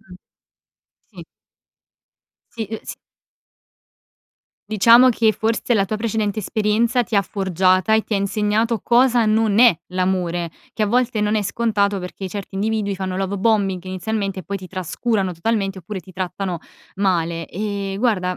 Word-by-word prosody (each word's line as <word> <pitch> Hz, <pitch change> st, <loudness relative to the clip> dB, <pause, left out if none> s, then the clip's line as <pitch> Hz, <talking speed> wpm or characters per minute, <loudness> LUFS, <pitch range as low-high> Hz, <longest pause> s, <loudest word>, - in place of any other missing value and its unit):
Mh, 190 Hz, -4 st, -15 dB, 1.0 s
sì. -, -, -11 dB, 1.3 s
Sì, 225 Hz, -2 st, -4 dB
uhm, 220 Hz, -, -4 dB
s -, -, -7 dB, 1.7 s
Diciamo, 230 Hz, +4 st, +7 dB
che 225 Hz, -2 st, +3 dB
forse 225 Hz, +2 st, -1 dB
la 195 Hz, -3 st, +2 dB
tua 215 Hz, -, -2 dB
precedente 215 Hz, -1 st, -1 dB
esperienza, 220 Hz, +4 st, +1 dB
ti 225 Hz, -2 st, -2 dB
ha 200 Hz, -, +4 dB
forgiata 185 Hz, +1 st, +1 dB
e 220 Hz, -, +3 dB
ti -, -, -7 dB
ha 200 Hz, -, +2 dB
insegnato 210 Hz, +3 st, 0 dB
cosa 240 Hz, -1 st, +4 dB
non 215 Hz, -1 st, +2 dB
è 240 Hz, -7 st, +7 dB, 0.2 s
l'amore, 180 Hz, -2 st, -1 dB, 0.2 s
che 220 Hz, -, -1 dB
a 210 Hz, -, +3 dB
volte 235 Hz, -1 st, +1 dB
non 210 Hz, +1 st, +1 dB
è 210 Hz, -, +1 dB
scontato, 205 Hz, -1 st, 0 dB
perché 185 Hz, +1 st, -6 dB
certi 200 Hz, 0 st, -7 dB
individui 210 Hz, 0 st, -1 dB
fanno 185 Hz, -1 st, -4 dB
love 195 Hz, +1 st, -2 dB
bombing 195 Hz, -3 st, +1 dB
inizialmente 195 Hz, +1 st, -3 dB
e -, -, -11 dB
poi 200 Hz, +4 st, -4 dB
ti 185 Hz, -, -10 dB
trascurano 190 Hz, +2 st, -2 dB
totalmente, 195 Hz, +2 st, -1 dB
oppure 190 Hz, +2 st, -6 dB
ti 185 Hz, +2 st, -15 dB
trattano 185 Hz, 0 st, -3 dB, 0.4 s
male 170 Hz, -4 st, 0 dB
ehm, 200 Hz, -1 st, -4 dB
guarda, 190 Hz, -6 st, 0 dB
200 Hz, 155 wpm, -21 LUFS, 185-220 Hz, 1.7 s, Diciamo